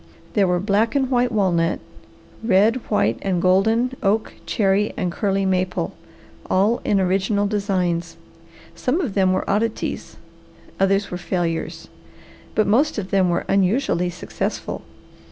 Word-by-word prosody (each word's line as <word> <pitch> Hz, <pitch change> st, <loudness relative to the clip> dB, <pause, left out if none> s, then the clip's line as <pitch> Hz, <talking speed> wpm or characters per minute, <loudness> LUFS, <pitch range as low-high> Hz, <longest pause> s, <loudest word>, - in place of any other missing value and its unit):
There 200 Hz, -2 st, +3 dB
were 180 Hz, 0 st, +1 dB
black 210 Hz, +6 st, +1 dB
and 265 Hz, -2 st, +1 dB
white 245 Hz, 0 st, +2 dB
walnut, 180 Hz, -6 st, +1 dB, 0.6 s
red, 220 Hz, +2 st, +4 dB
white, 105 Hz, +3 st, +1 dB
and 190 Hz, -3 st, 0 dB
golden 220 Hz, +8 st, +2 dB
oak, 215 Hz, +2 st, 0 dB
cherry 205 Hz, -1 st, +1 dB
and 180 Hz, -, -1 dB
curly 195 Hz, +1 st, 0 dB
maple, 185 Hz, -, -1 dB, 0.6 s
all 205 Hz, +5 st, +2 dB
in 200 Hz, -, +2 dB
original 195 Hz, +2 st, +1 dB
designs. 180 Hz, -5 st, -1 dB, 0.6 s
Some 260 Hz, +7 st, -1 dB
of 280 Hz, -, -2 dB
them 190 Hz, -2 st, +3 dB
were 185 Hz, -, -1 dB
oddities, 215 Hz, +2 st, -2 dB, 0.6 s
others 195 Hz, +1 st, +2 dB
were 180 Hz, -, -4 dB
failures, 175 Hz, -2 st, -3 dB, 0.7 s
but 215 Hz, -, +3 dB
most 265 Hz, +9 st, +2 dB
of 195 Hz, -3 st, -4 dB
them 190 Hz, -2 st, +3 dB
were 170 Hz, -, 0 dB
unusually 195 Hz, -2 st, +1 dB
successful. 175 Hz, -, -4 dB
195 Hz, 135 wpm, -22 LUFS, 180-215 Hz, 0.7 s, red